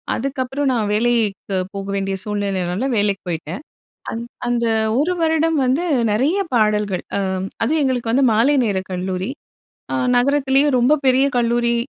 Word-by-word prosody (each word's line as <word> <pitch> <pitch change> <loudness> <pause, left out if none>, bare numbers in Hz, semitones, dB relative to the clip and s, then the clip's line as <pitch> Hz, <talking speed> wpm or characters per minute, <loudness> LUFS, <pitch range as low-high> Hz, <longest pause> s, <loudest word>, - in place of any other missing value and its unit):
அதுக்கப்புறம் 270 +1 -2
நான் 220 -4 0
வேலைக்கு 215 -4 0 0.2
போக 195 0 -5
வேண்டிய 195 0 -1
சூழ்நிலைனால, 200 +1 -2
வேலைக்கு 205 -1 0
போயிட்டேன். 165 - -5 0.5
அந் 230 - -4 0.2
அந்த 240 -1 0 0.3
ஒரு 345 +5 +1
வருடம் 320 0 +2
வந்து 265 +7 +1 0.3
நெறைய 275 - +1 0.2
பாடல்கள். 210 -4 +1
அ - - 0 0.4
அதுவும் 305 +6 +1
எங்களுக்கு 245 -4 0
வந்து 265 +3 +3
மாலை 240 +7 +3
நேர 205 -3 0
கல்லூரி. 185 +2 -3 0.6
அ - - 0 0.2
நகரத்திலயே 275 +2 +3
ரொம்ப 250 +5 +4
பெரிய 260 +1 +4
கல்லூரி. 235 0 +1
235 Hz, 135 wpm, -20 LUFS, 200-270 Hz, 0.6 s, ரொம்ப